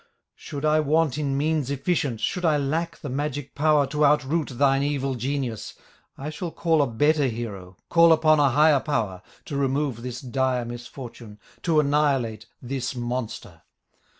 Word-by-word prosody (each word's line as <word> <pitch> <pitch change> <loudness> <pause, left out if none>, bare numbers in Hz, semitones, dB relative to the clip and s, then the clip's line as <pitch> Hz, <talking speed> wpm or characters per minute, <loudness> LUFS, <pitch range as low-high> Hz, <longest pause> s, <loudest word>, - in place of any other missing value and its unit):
"Should 145 +1 -6
I 155 0 +4
want 155 -1 +1
in 140 -2 -1
means 150 -2 0
efficient, 140 -4 -1
Should 180 - -1
I 155 -3 +3
lack 160 +4 -2
the - - -6
magic 145 +1 -3
power 150 0 +3
To 150 +2 -1
outroot 150 +2 +2
thine 135 0 +3
evil 140 -1 -1
genius, 125 -3 -3 0.4
I 145 +3 -5
shall 170 +3 -5
call 160 -1 +1
a 145 - +2
better 145 +5 +2
hero, 100 -6 -6
Call 170 0 +6
upon 155 -1 +5
a 145 -1 +5
higher 150 +2 +4
power, 110 - -2 0.2
To 145 - -6
remove 135 -3 0
this 125 0 -5
dire 130 -1 -1
misfortune, 120 -2 -9 0.2
To 165 -3 +2
annihilate 140 -7 +1 0.2
this 125 0 -3
monster. 120 -1 -5
140 Hz, 155 wpm, -25 LUFS, 125-150 Hz, 0.4 s, Call